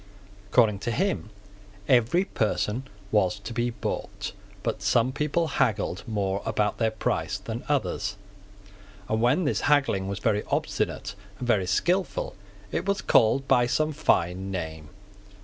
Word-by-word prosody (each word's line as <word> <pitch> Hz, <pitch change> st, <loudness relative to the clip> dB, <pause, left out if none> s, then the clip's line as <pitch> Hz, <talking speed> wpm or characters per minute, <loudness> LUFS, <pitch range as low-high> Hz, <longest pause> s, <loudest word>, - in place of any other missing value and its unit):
According 105 Hz, -2 st, +4 dB
to 120 Hz, -, -2 dB
him, 185 Hz, -, 0 dB, 0.6 s
every 130 Hz, +9 st, +4 dB
person 115 Hz, -, -1 dB, 0.2 s
was 105 Hz, -1 st, +2 dB
to 115 Hz, -, -6 dB
be 120 Hz, +1 st, 0 dB
bought: 115 Hz, -, -4 dB, 0.3 s
but -, -, -2 dB
some 120 Hz, +2 st, +3 dB
people 150 Hz, +4 st, 0 dB
haggled 105 Hz, -, 0 dB
more 100 Hz, -3 st, -1 dB
about 105 Hz, -1 st, 0 dB
their 115 Hz, -1 st, +3 dB
price 110 Hz, -, -1 dB
than 115 Hz, +1 st, -6 dB
others; 105 Hz, -7 st, 0 dB, 0.9 s
and 110 Hz, 0 st, 0 dB
when 125 Hz, +10 st, +3 dB
this 145 Hz, -, 0 dB
haggling 135 Hz, -10 st, +2 dB
was 100 Hz, 0 st, -3 dB
very 105 Hz, 0 st, +1 dB
obstinate 100 Hz, +1 st, -1 dB, 0.2 s
and 125 Hz, -, -5 dB
very 100 Hz, -6 st, +2 dB
skilful 190 Hz, -, 0 dB, 0.4 s
it -, -, -2 dB
was 200 Hz, 0 st, +1 dB
called 135 Hz, +4 st, +4 dB
by 120 Hz, -1 st, +4 dB
some 155 Hz, +5 st, +1 dB
fine 95 Hz, -, +1 dB
name. 80 Hz, -5 st, -5 dB
115 Hz, 140 wpm, -26 LUFS, 100-140 Hz, 0.9 s, According